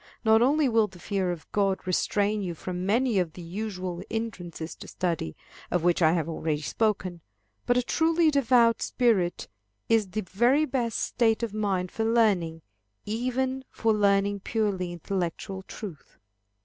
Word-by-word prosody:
Not 220 0 +6
only 285 +4 +4
will 225 -3 +3
the 185 - -15
fear 190 0 -1
of 170 -2 -6
God 195 -2 0
restrain 205 +3 +1
you 175 -3 -3
from 180 +2 -4
many 230 0 +2
of 170 -3 -1
the 180 - -9
usual 185 -1 -4
hindrances 175 -8 -5
to - - -10
study, 165 - -2 0.3
of 175 -2 0
which 175 +1 +2
I 160 -1 +5
have 165 -3 0
already 155 -2 -2
spoken, 185 -4 -1 0.5
but 245 - +3
a 250 - +2
truly 325 +4 +3
devout 240 -4 +4
spirit 200 -9 +1 0.4
is 225 -3 +3
the 215 +4 -2
very 240 - +2
best 245 -5 -1
state 230 -1 +1
of 225 -3 -2
mind 195 -4 -1
for 225 - -2
learning, 200 -9 +2 0.4
even 255 +4 -1
for 225 -1 +1
learning 200 -1 +2
purely 195 -4 -1
intellectual 185 +2 -3
truth. 190 -4 -10
205 Hz, 155 wpm, -27 LUFS, 180-230 Hz, 0.5 s, Not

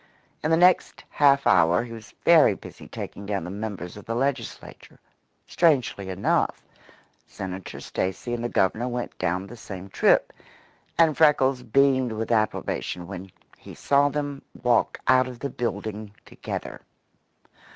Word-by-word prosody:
In 155 - 0
the 165 - +4
next 180 +1 +3
half 140 -1 +4
hour 85 +5 +4
he 120 - -9
was 115 -1 -11
very 160 -11 +6
busy - - -12
taking 100 - -7
down 100 -4 -2
the 90 - -6
members 100 -3 -6
of 105 - -11
the 115 - -2
Legislature. 130 -1 -4 0.5
Strangely 130 - +1
enough, 95 +1 0 0.6
Senator 95 0 -7
Stacy 95 +6 -3
and 120 -1 -3
the 120 - -1
Governor 110 +5 +1
went 125 -1 -4
down 90 +1 -1
the 105 - -11
same 95 -4 -9
trip, - - +3 0.6
and 160 -3 +4
Freckles 135 -4 +4
beamed 130 0 +2
with 110 +1 -3
approbation 110 -5 -1
when, 95 0 -8 0.3
he - - -12
saw 140 0 +3
them 145 -1 -4 0.2
walk 120 -1 +2
out 130 0 +5
of 125 -1 -8
the 140 +2 -5
building 110 -3 -4
together. - - -7
120 Hz, 145 wpm, -25 LUFS, 100-140 Hz, 0.6 s, very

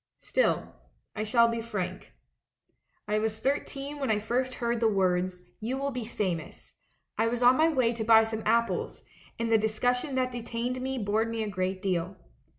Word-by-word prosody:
Still, - - 0 0.4
I 215 - -2
shall 235 +2 +4
be 230 0 -2
frank. 190 -5 -5 1.0
"I 210 +1 +1
was 220 0 -2
thirteen 280 +2 -2
when 270 - -1
I 215 - +3
first 250 +4 -1
heard 235 -1 -1
the 225 - +3
words, 185 -3 +1 0.2
'You 240 +5 -2
will 280 +1 -2
be 250 -3 -4
famous.' 185 -8 -4 0.5
I 225 - +3
was 240 +1 -1
on 250 +1 +7
my 315 +4 +4
way 255 -6 +2
to 230 -1 -3
buy 225 0 +7
some 220 0 -3
apples, 230 +1 0 0.3
and 230 0 -1
the 225 - +5
discussion 245 +5 0
that 255 -1 +1
detained 240 +1 -3
me 265 +1 -2
bored 220 0 0
me 225 -1 -2
a 215 - -3
great 185 0 -2
deal. 185 0 -1
230 Hz, 180 wpm, -28 LUFS, 210-250 Hz, 1.0 s, on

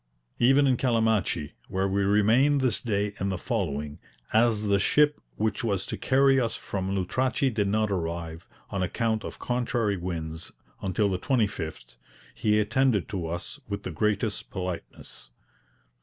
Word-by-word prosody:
Even 135 +4 +5
in 130 -2 +3
Calamachi, 110 - +1 0.2
where 95 +1 0
we 100 +1 0
remained 110 +8 +4
this 130 -3 +1
day 105 -3 -1
and 100 +1 -1
the 95 - -2
following, 75 -3 -3 0.3
as 110 -1 +3
the 100 -1 +2
ship 150 +8 +3
which 110 +4 -1
was 100 -5 0
to - - -4
carry 135 0 +3
us 115 - -1
on - - -13
from 95 0 -3
Lutrachi 130 +8 +1
did 105 -2 +1
not 105 +1 +1
arrive, 85 -1 -3 0.2
on 100 -3 -2
account 110 +4 0
of - - -6
contrary 120 -4 0
winds, 80 -2 -4 0.3
until 100 +2 +1
the 95 -2 -1
25th, 85 - -2 0.4
he 105 0 +2
attended 115 -1 +2
to 95 -6 -3
us 85 - -4
with 100 0 -4
the - - -4
greatest 105 +3 -1
politeness. 90 -9 -6
105 Hz, 155 wpm, -27 LUFS, 90-120 Hz, 0.4 s, Even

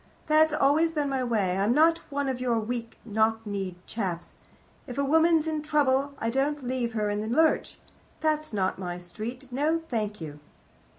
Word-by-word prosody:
That's 310 0 +4
always 300 +3 +3
been 295 -3 0
my 265 -1 0
way. 205 -7 +1
I'm 210 +5 +2
not 325 +2 +5
one 285 0 -1
of 260 -2 -2
your 240 -3 +1
weak 230 +1 -4
knock 220 0 +1
kneed 195 -3 -3
chaps. 185 -6 -4 0.5
If 250 -1 -7
a 280 - +2
woman's 320 +2 +4
in 310 -1 -1
trouble, 280 -2 +1
I 230 -2 -1
don't 280 +3 0
leave 245 -2 -1
her 210 -2 0
in 205 0 -1
the 215 - -4
lurch. 315 +6 +2 0.4
That's 310 -1 0
not 190 -3 -1
my 175 -2 -4
street. 225 +9 -7
No, 295 +6 +1
thank 210 -3 -2
you. 150 -3 -7
250 Hz, 180 wpm, -27 LUFS, 215-295 Hz, 0.5 s, not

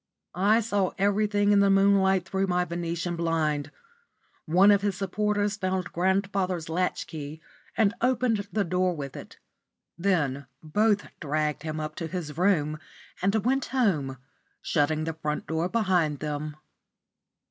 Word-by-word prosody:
I 210 +5 +3
saw 205 -4 0
everything 205 +1 +2
in 205 - +5
the 200 0 +4
moonlight 195 -1 +4
through 195 0 0
my 180 -1 +1
Venetian 170 0 -3
blind. 155 -4 0 0.8
One 185 +6 +6
of 200 -1 +4
his 200 -2 -1
supporters 205 +1 0
found 185 -2 -2
grandfather's 190 -2 0
latch 180 +3 -1
key 155 -1 -7 0.4
and 215 -2 +3
opened 240 -4 +1
the 210 - +1
door 180 0 0
with 140 -3 -6
it. - - -10 0.6
Then 145 -8 0 0.2
both 205 +6 +2
dragged 150 -1 -1
him 155 0 -4
up 155 0 -4
to 165 - -3
his 160 -3 -5
room 155 -4 +1 0.4
and 195 +3 +2
went 265 +2 +2
home, 165 - 0 0.4
shutting 155 0 0
the 165 0 -2
front 150 -1 -3
door 160 +2 -1
behind 180 -9 +1
them. 150 0 -4
180 Hz, 140 wpm, -27 LUFS, 155-200 Hz, 0.8 s, One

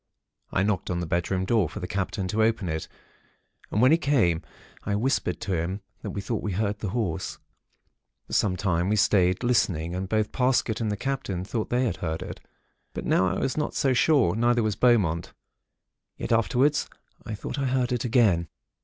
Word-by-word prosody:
I 95 - +1
knocked 100 -2 -1
on 90 -1 -1
the 90 - -2
bedroom 90 +3 -1
door, 105 -6 +2
for - - -7
the - - -4
Captain 95 +1 -2
to 110 +4 +1
open 110 -3 +1
it, 80 0 -3 0.8
and 105 - +1
when 130 - +6
he 165 - +5
came, 110 - +2 0.4
I 100 - -1
whispered 130 +6 0
to 100 - -2
him 90 +4 -2 0.2
that - - -5
we 100 - -4
thought 110 +2 -3
we 105 - -3
heard 100 +1 -1
the 105 - -3
Horse. 100 -6 -2 0.9
For - - -10
some 95 -4 +2
time 90 -2 0
we 105 - +2
stayed, 95 -1 +3
listening, 90 -9 +1
and 95 +1 -3
both 110 0 0
Parsket 125 -4 +1
and 110 -2 0
the 105 - -2
Captain 105 -9 -3
thought 110 +1 -3
they 125 +1 +1
heard 80 -2 -4
it; - - -8 0.6
but - - -4
now 95 - +3
I 95 - -1
was 130 - -1
not 150 - -1
so 135 -2 +2
sure, 125 - +3
neither 120 +1 +2
was 110 -2 0
Beaumont. 100 -8 +2 0.8
Yet - - -5
afterwards, 125 +6 +2 0.3
I 110 - -5
thought 120 - -5
I 135 - 0
heard 125 -1 0
it 125 -2 0
again. 110 -9 +3
105 Hz, 195 wpm, -26 LUFS, 90-120 Hz, 0.9 s, when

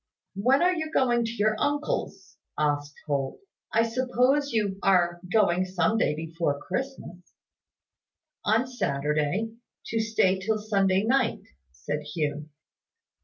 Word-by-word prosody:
"When 255 - +3
are 365 +1 +4
you 315 -3 -3
going 240 -6 +2
to 225 - -3
your 215 -1 +1
uncle's?" 290 +1 -2 0.2
asked 145 -1 0
Holt. 140 -3 -2 0.3
"I 225 - +3
suppose 255 +4 +1
you 205 -4 0
are 175 -2 +3
going 185 -5 +3
some 185 +3 +1
day 150 - +2
before 160 -2 -2
Christmas." 255 - -5 1.3
"On 255 - +2
Saturday, 155 - -1 0.3
to 225 - -1
stay 220 -4 +2
till 215 +3 0
Sunday 195 -2 +1
night," 260 +4 +1 0.3
said 145 - -4
Hugh. 150 -1 -2
200 Hz, 120 wpm, -27 LUFS, 160-240 Hz, 1.3 s, are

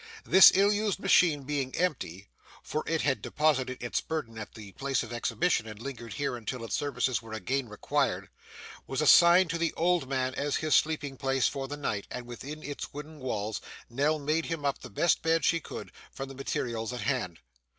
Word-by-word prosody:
This 190 - +9
ill 200 +2 +5
used 210 -1 0
machine 175 -7 +4
being 135 -2 -2
empty 100 - -2 0.4
(for 155 - -3
it 160 -1 +1
had 135 -2 +1
deposited 130 -5 0
its 120 - -1
burden 155 -8 -4
at 110 - -8
the 105 -3 -10
place 135 +4 -1
of 115 0 -8
exhibition, 120 +1 0
and 110 -1 -9
lingered 120 -2 -7
here 140 -3 -2
until 120 +1 -5
its - - -6
services 130 -3 0
were 115 -1 -10
again 130 +3 -2
required) 105 - -1 0.6
was 135 - -3
assigned 170 +3 +7
to 170 - -2
the 165 -1 0
old 170 -5 +1
man 130 -1 0
as 145 +1 -1
his 155 -1 0
sleeping 145 -3 +1
place 135 -1 +1
for 135 -1 -4
the 145 +2 -5
night; 105 -8 -3
and 125 -1 -6
within 140 +6 -8
its 145 0 -6
wooden 150 +2 -9
walls, 110 -5 -3 0.3
Nell 145 +5 +1
made 155 +2 -1
him 165 -3 -3
up 140 - 0
the - - -10
best 160 +11 +2
bed 165 0 +2
she 165 - +3
could, - - -8 0.2
from 135 0 -6
the - - -8
materials 120 -4 -3
at 125 - -5
hand. 90 - -2
140 Hz, 195 wpm, -29 LUFS, 120-155 Hz, 0.6 s, This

